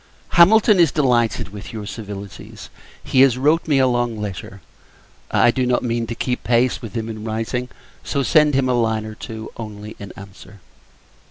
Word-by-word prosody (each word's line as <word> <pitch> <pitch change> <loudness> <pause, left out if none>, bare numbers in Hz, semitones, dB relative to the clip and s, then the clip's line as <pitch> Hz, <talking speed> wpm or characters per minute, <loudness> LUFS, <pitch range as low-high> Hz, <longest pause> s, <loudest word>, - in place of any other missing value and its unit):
Hamilton 205 +3 +5
is 170 - +5
delighted 120 - +1
with 100 0 -9
your 110 -2 -6
civilities. 100 -2 -9 0.3
He 130 - +2
has 130 -2 +5
wrote 150 +6 +2
me 145 -3 +3
a 130 - +4
long 120 -3 0
letter. 100 -1 -6 0.7
I 120 - +4
do 130 +1 -1
not 125 0 +1
mean 115 -1 -2
to 115 - -5
keep 125 +1 -3
pace 120 +3 +1
with 115 -1 -9
him 110 -1 -3
in 110 -1 -7
writing; 115 +3 -3 0.3
so, 140 -2 -1
send 150 -1 +4
him 135 -1 +2
a 125 - +1
line 110 -2 0
or 110 - -7
two, 110 0 -8
only, 105 -1 -8
in 100 -2 -8
answer. 100 0 -13
115 Hz, 180 wpm, -20 LUFS, 110-130 Hz, 0.7 s, Hamilton